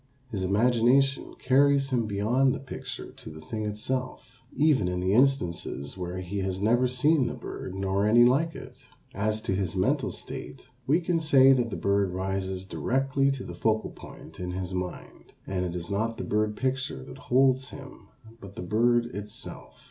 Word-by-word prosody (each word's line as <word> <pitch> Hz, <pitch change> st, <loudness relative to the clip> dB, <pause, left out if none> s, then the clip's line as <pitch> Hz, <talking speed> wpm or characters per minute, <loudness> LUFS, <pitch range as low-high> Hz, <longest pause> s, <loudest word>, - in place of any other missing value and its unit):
His 100 Hz, -4 st, -3 dB
imagination 120 Hz, +7 st, +2 dB
carries 135 Hz, +1 st, +3 dB
him 120 Hz, -3 st, +1 dB
beyond 120 Hz, +7 st, +2 dB
the -, -, -5 dB
picture 135 Hz, -, -8 dB
to -, -, -12 dB
the 80 Hz, 0 st, -10 dB
thing 110 Hz, +6 st, -5 dB
itself, 125 Hz, +3 st, -4 dB, 0.2 s
even 145 Hz, -10 st, +3 dB
in 90 Hz, 0 st, -1 dB
the 95 Hz, +2 st, +1 dB
instances 105 Hz, -, +1 dB
where 90 Hz, 0 st, -5 dB
he 95 Hz, +3 st, -4 dB
has 95 Hz, -1 st, -2 dB
never 120 Hz, +5 st, +3 dB
seen 130 Hz, +2 st, +2 dB
the -, -, -4 dB
bird 95 Hz, -, -7 dB
nor 95 Hz, +1 st, 0 dB
any 120 Hz, +2 st, +6 dB
like 150 Hz, +7 st, +2 dB
it. -, -, -10 dB, 0.4 s
As 110 Hz, +2 st, -1 dB
to -, -, -1 dB
his 95 Hz, -2 st, -1 dB
mental 130 Hz, +10 st, +1 dB
state, 130 Hz, 0 st, -8 dB, 0.2 s
we 155 Hz, +6 st, +3 dB
can 170 Hz, -1 st, 0 dB
say 135 Hz, -4 st, +6 dB
that 120 Hz, -3 st, +1 dB
the -, -, -4 dB
bird 100 Hz, -1 st, +1 dB
rises 95 Hz, 0 st, -3 dB
directly 135 Hz, +6 st, 0 dB
to 135 Hz, -2 st, -3 dB
the -, -, -7 dB
focal 110 Hz, -1 st, 0 dB
point -, -, -12 dB
in 90 Hz, 0 st, -4 dB
his 90 Hz, 0 st, -4 dB
mind, 90 Hz, -1 st, -6 dB
and 95 Hz, -1 st, -2 dB
it 90 Hz, -1 st, -3 dB
is 85 Hz, +1 st, -5 dB
not 115 Hz, +3 st, -1 dB
the -, -, -4 dB
bird 105 Hz, 0 st, 0 dB
picture 130 Hz, -, -2 dB
that -, -, -11 dB
holds 130 Hz, 0 st, +2 dB
him 135 Hz, -1 st, -11 dB, 0.3 s
but 100 Hz, -1 st, -11 dB
the -, -, -6 dB
bird 120 Hz, +5 st, +2 dB
itself. 105 Hz, +1 st, -8 dB
110 Hz, 180 wpm, -27 LUFS, 95-130 Hz, 0.4 s, any